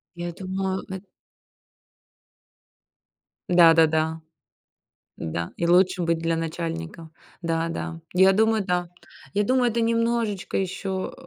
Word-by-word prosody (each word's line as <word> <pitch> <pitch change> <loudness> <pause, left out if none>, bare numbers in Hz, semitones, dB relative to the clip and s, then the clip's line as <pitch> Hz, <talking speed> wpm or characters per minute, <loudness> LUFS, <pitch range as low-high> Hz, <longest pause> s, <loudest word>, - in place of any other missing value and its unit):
Я 175 0 -5
думаю 190 +1 -3
эт 190 0 -6 2.4
Да-да-да. 160 -2 +4 1.0
Да, 85 +1 -4
и 170 - -2
лучше 180 +1 +3
быть 165 0 +1
для 165 0 0
начальника. 165 - -5 0.3
Да, 165 0 -1
да, 165 0 -5
я 190 +1 +5
думаю, 220 0 +2
да. 180 -2 -1 0.4
Я 205 - +2
думаю, 250 +2 +2
это 235 - -1
немножечко 230 -3 0
еще, 190 0 -3
180 Hz, 105 wpm, -24 LUFS, 165-195 Hz, 2.4 s, я